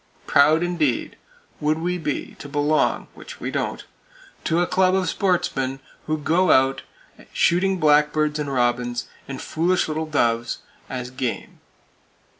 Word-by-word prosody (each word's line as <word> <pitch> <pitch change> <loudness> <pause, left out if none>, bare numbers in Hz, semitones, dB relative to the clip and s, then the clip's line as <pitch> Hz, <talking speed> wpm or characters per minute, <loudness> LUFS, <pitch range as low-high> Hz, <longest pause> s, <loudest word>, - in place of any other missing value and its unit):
Proud 155 +4 +4
indeed, 165 -8 0 0.4
would 155 +1 +1
we 175 +2 -2
be 150 -4 -3
to 145 - -8
belong 145 +1 +1
(which - - -11
we - - -4
don't) - - -3 0.6
to 165 0 +2
a 175 - +3
club 185 +1 +2
of 190 -1 +1
"sportsmen" 135 -8 0 0.3
who 155 0 0
go 165 +5 +2
out 135 -1 +4 0.5
shooting 190 +2 +2
blackbirds, 150 -1 +3
and 145 -2 -3
robins, 120 -1 0 0.2
and 135 -1 -6
foolish 175 +3 0
little 155 0 -2
doves, 120 -5 0 0.3
as 125 -1 -5
"game!" 130 -2 -4
150 Hz, 135 wpm, -23 LUFS, 135-170 Hz, 0.6 s, Proud